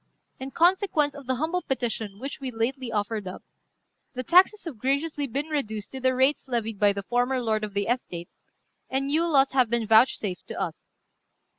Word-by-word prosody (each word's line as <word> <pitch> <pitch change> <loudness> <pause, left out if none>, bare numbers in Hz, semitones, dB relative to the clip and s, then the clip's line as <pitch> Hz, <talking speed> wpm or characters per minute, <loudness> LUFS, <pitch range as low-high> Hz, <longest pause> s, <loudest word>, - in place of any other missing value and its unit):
In 265 +1 -5
consequence 340 -2 +2
of 280 -3 -11
the 260 - +1
humble 325 +7 -1
petition 230 - -3
which 275 +5 -6
we 270 -2 -4
lately 240 +2 -2
offered 210 -1 -2
up, 185 - -8 0.7
the 255 - -3
taxes 370 - +5
have 290 -10 -7
graciously 280 +3 -1
been 280 +5 -3
reduced 220 -9 -3
to 265 - -5
the 260 0 +2
rates 265 +3 +2
levied 225 -4 -2
by 205 -1 +5
the 200 0 -4
former 245 +4 0
lord 220 -3 0
of 205 -1 -5
the 200 0 +1
estate, 180 -8 -3 0.6
and 270 +1 0
new 315 +5 +1
laws 275 -4 +4
have 255 -3 +3
been 235 -1 0
vouchsafed 220 -4 +3
to - - -6
us. 175 -5 -5
255 Hz, 185 wpm, -26 LUFS, 220-280 Hz, 0.7 s, taxes